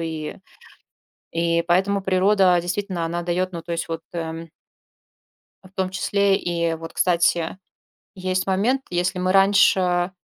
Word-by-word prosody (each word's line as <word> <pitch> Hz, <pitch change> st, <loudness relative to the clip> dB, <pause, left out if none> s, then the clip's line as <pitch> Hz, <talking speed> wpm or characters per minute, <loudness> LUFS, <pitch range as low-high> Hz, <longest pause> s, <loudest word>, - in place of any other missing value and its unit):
и 160 Hz, -2 st, -5 dB, 1.0 s
и 170 Hz, 0 st, +1 dB
поэтому 195 Hz, +3 st, +2 dB
природа 190 Hz, -1 st, +3 dB
действительно 185 Hz, -1 st, -3 dB
она 170 Hz, +1 st, -3 dB
дает 180 Hz, +2 st, -1 dB
Ну, 170 Hz, -, -5 dB
то 170 Hz, +1 st, -8 dB
есть 165 Hz, 0 st, -3 dB
вот, 165 Hz, 0 st, -3 dB
э 165 Hz, 0 st, -5 dB, 1.2 s
в 185 Hz, -, -16 dB
том 190 Hz, -1 st, -1 dB
числе 200 Hz, +1 st, +1 dB
и 170 Hz, -1 st, -1 dB
вот, 165 Hz, 0 st, -9 dB
кстати, 170 Hz, 0 st, +1 dB, 0.6 s
есть 185 Hz, 0 st, -2 dB
момент, 225 Hz, +8 st, +1 dB
если 180 Hz, +1 st, -1 dB
мы 185 Hz, +1 st, +1 dB
раньше, 190 Hz, -2 st, +3 dB
180 Hz, 135 wpm, -22 LUFS, 170-190 Hz, 1.2 s, природа